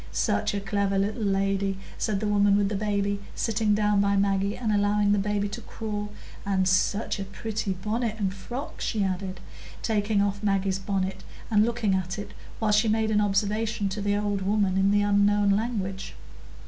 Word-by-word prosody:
"Such 100 - 0
a - - 0
clever 200 0 0
little 205 +4 -1
lady," 195 -1 0 0.2
said 210 -3 -1
the 215 - 0
woman 205 -1 +4
with 200 -1 +2
the 210 - -2
baby 200 0 0 0.2
sitting 220 -2 +1
down 210 -1 +2
by 200 0 +2
Maggie, 200 0 +1
and 225 -3 -1
allowing 205 0 +2
baby 205 0 +1
to 225 +4 -6
crawl; 210 -2 -5 0.3
"and 190 -2 +1
such 200 +3 +1
a - - -2
pretty 205 +1 -3
bonnet 215 +4 -2
and 195 -3 -1
frock," 240 +9 -7
she 215 -3 0
added, 185 -1 -3 0.4
taking 210 -1 +1
off 200 0 0
Maggie's 195 -2 +1
bonnet 190 -1 -2 0.3
and 210 -1 +5
looking 230 -3 0
at 185 0 -1
it 205 - -6 0.3
while 220 -1 +1
she 215 +2 +4
made 220 0 +1
an 210 -1 +3
observation 210 +1 0
to 205 +2 -4
the 205 0 +1
old 205 -1 -1
woman, 195 -1 +1
in 195 +1 +3
the 205 0 +3
unknown 205 0 +3
language. 200 -3 -2
205 Hz, 180 wpm, -26 LUFS, 195-210 Hz, 0.4 s, and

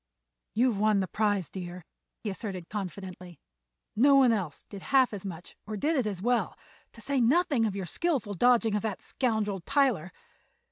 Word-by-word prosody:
"You've 235 -2 +2
won 215 -1 +3
the 190 - -1
prize, 205 -3 0
dear," 175 +1 -8 0.3
he 210 - -4
asserted 190 -4 -6
confidently. 185 -3 -7 0.6
"No 275 +5 +5
one 265 -3 +6
else 185 -10 -3
did 200 -2 -9
half 260 -1 +3
as 200 - -5
much 180 -3 -8
or 215 0 -4
did 310 +10 +1
it 255 -6 +1
as 195 -3 -4
well, 245 0 +1 0.4
to 230 - -13
say 270 +2 0
nothing 275 -2 +3
of 200 - -4
your 195 -2 -3
skillful 265 - -1
dodging 230 +2 +3
of 210 - +1
that 210 -3 -4
scoundrel 220 -6 -1
Tyler. 230 - +1
210 Hz, 175 wpm, -29 LUFS, 190-245 Hz, 0.6 s, one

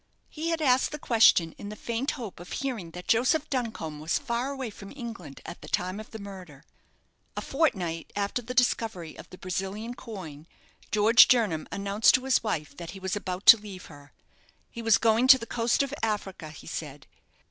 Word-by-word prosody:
He 315 +2 -4
had 325 -1 -1
asked 260 -2 +3
the 300 - -4
question 220 - +4
in 205 - -7
the 210 - -7
faint 235 +5 -3
hope 220 -10 -7
of 175 - -11
hearing 240 -11 -3
that 180 +2 -10
Joseph 260 +7 +2
Duncombe 220 - -3
was 155 +2 0
far 250 -1 -2
away 265 -5 -5
from 200 -1 -11
England 230 - -8
at - - -8
the - - -10
time 185 +3 -1
of 215 - -9
the 220 - -8
murder. 185 -8 -10 0.7
A - - -1
fortnight 175 - -1
after 205 +4 -1
the 250 +2 -7
discovery 225 -9 0
of - - -12
the 185 - -12
Brazilian 195 +6 -4
coin, 170 - -9 0.4
George 215 +3 +7
Jernam 210 -11 +2
announced 200 +2 +3
to 255 - -1
his 265 - +3
wife 155 -9 -3
that 170 -1 -7
he - - -10
was 190 +1 -2
about 185 -1 -5
to 230 - +11
leave 205 -3 -10
her. 145 0 -15 0.6
He 235 - -7
was 225 -2 +4
going 230 +2 +3
to 265 - +10
the 230 - -7
coast 235 +3 +1
of 275 0 -5
Africa, 200 -7 -3
he 155 - -12
said. 145 -4 -7
210 Hz, 195 wpm, -27 LUFS, 180-240 Hz, 0.7 s, to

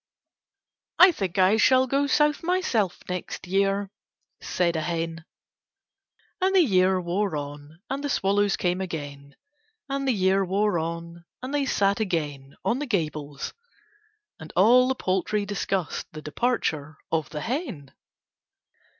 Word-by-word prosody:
"I 365 0 +9
think 195 - -4
I 190 +3 +5
shall 260 +3 +5
go 275 +2 +1
South 295 0 +2
myself 330 - 0
next 180 0 -5
year," 195 +1 0 0.5
said 170 -2 0
a 160 - 0
hen. 165 0 -3 1.2
And 380 +1 +2
the 375 - +7
year 185 - +3
wore 180 +1 -1
on 145 +3 -7
and 275 +2 -3
the 285 - -2
swallows 200 -4 +2
came 180 +1 0
again, 145 -5 -6 0.5
and 275 0 -2
the - - +4
year 195 -2 +2
wore 195 0 +1
on 170 +1 -6 0.2
and 260 +2 -5
they 285 -2 +1
sat 200 -3 +2
again 145 -9 -3
on 245 - +1
the 295 - -3
gables, 150 - -3 0.9
and 160 -1 -10
all 240 +8 +6
the 265 - 0
poultry 200 +1 -1
discussed 195 -3 -2
the 155 - -7
departure 155 - -1
of 160 -2 0
the 150 0 -5
hen. 225 - -4
190 Hz, 140 wpm, -25 LUFS, 165-240 Hz, 1.2 s, I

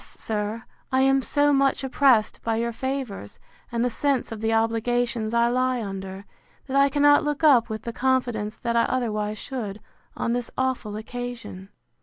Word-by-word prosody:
sir, 215 +1 -4 0.3
I 260 0 +3
am 270 0 +4
so 290 +2 +2
much 275 0 +2
oppressed 260 -4 +3
by 225 -1 -1
your 235 +1 -1
favours, 255 - -5 0.3
and 235 0 0
the 245 - 0
sense 275 0 0
of 220 -1 -6
the 225 0 0
obligations 225 0 0
I 235 0 +3
lie 255 0 +1
under, 195 -2 -6 0.4
that 270 - -4
I 280 0 +5
cannot 290 +1 +5
look 295 +1 -2
up 250 -7 +5
with 220 0 -5
the 235 - -5
confidence 240 -4 0
that 235 -1 -2
I 230 - +4
otherwise 215 -4 -1
should, 215 -5 -5 0.4
on 235 - 0
this 245 -1 -2
awful 255 -5 -1
occasion. 235 -4 -7
240 Hz, 170 wpm, -25 LUFS, 220-260 Hz, 0.4 s, I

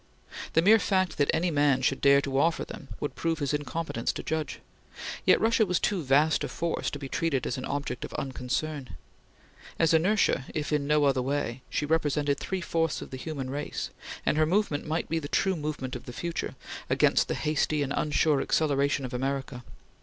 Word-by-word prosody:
The 165 - +4
mere 220 +4 +7
fact 185 -5 0
that 145 - +3
any 170 +2 +1
man 145 -3 +3
should 135 +1 +1
dare 140 0 +6
to 135 -1 -1
offer 165 +3 +2
them 140 - -9
would 145 - -3
prove 165 -1 -1
his 145 -2 -1
incompetence 150 -4 -2
to - - -6
judge. 160 0 -2 0.7
Yet - - +6
Russia 225 0 +3
was 180 -4 +1
too 195 -4 0
vast 145 +3 +3
a - - -1
force 170 -1 -2
to - - -5
be 140 -1 -6
treated 140 -2 -1
as - - -1
an - - -5
object 140 -4 -3
of - - -6
unconcern. 135 - -3 0.8
As 165 -1 +3
inertia, 175 -4 +3
if 150 0 -2
in 145 -1 +1
no 150 0 +3
other 135 -2 +3
way, 135 -2 -2
she 150 - -1
represented 145 -2 +1
three 190 -1 -3
fourths 165 -2 -1
of - - -12
the - - -5
human 135 -2 -5
race, 145 +2 -4 0.3
and 150 - +2
her 155 - +5
movement 180 -5 0
might 160 +2 -1
be 165 - 0
the 145 - -6
true 190 +5 +1
movement 150 -4 -4
of 125 - -8
the 125 - -7
future, 170 +6 -4 0.3
against - - +3
the - - -1
hasty 150 0 0
and 140 0 -2
unsure 150 -1 +2
acceleration 140 -2 +1
of 125 - -7
America. 130 -1 -3
150 Hz, 200 wpm, -28 LUFS, 140-165 Hz, 0.8 s, mere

